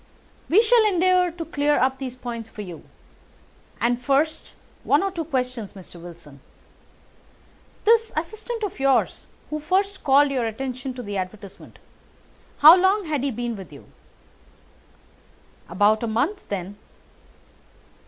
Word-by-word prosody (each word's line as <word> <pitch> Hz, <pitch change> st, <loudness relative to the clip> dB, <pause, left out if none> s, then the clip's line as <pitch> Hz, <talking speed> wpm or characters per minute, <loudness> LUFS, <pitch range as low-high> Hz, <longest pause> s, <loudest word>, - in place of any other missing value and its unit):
"We 410 Hz, +8 st, +5 dB
shall 465 Hz, 0 st, +4 dB
endeavour 365 Hz, -1 st, +3 dB
to 335 Hz, 0 st, -7 dB
clear 295 Hz, -2 st, +1 dB
up 265 Hz, +1 st, +1 dB
these 255 Hz, -2 st, -6 dB
points 235 Hz, -3 st, -7 dB
for 210 Hz, -, -8 dB
you. 175 Hz, -4 st, -9 dB, 1.0 s
And, 240 Hz, +1 st, 0 dB
first, 280 Hz, +5 st, 0 dB, 0.3 s
one -, -, +3 dB
or 390 Hz, -, -1 dB
two 340 Hz, -3 st, -4 dB
questions, 250 Hz, -7 st, -3 dB
Mr. 180 Hz, -3 st, -13 dB
Wilson. 165 Hz, -5 st, -13 dB, 1.5 s
This 455 Hz, 0 st, +4 dB
assistant 435 Hz, +7 st, -4 dB
of 405 Hz, -, -4 dB
yours 270 Hz, -1 st, +1 dB, 0.2 s
who 305 Hz, -, -2 dB
first 385 Hz, +5 st, -1 dB
called 280 Hz, +1 st, +4 dB
your 250 Hz, -4 st, -1 dB
attention 255 Hz, +2 st, -5 dB
to 250 Hz, -, -7 dB
the 205 Hz, -2 st, -5 dB
advertisement—how 200 Hz, -, 0 dB
long 380 Hz, +2 st, +2 dB
had 300 Hz, -4 st, -2 dB
he 280 Hz, -, -1 dB
been 240 Hz, -1 st, -4 dB
with 190 Hz, -6 st, -10 dB
you?" 140 Hz, -, -13 dB, 1.8 s
"About 205 Hz, +5 st, +2 dB
a 235 Hz, -, -2 dB
month 275 Hz, -, -2 dB
then." 200 Hz, +1 st, -5 dB
265 Hz, 135 wpm, -23 LUFS, 220-345 Hz, 1.8 s, We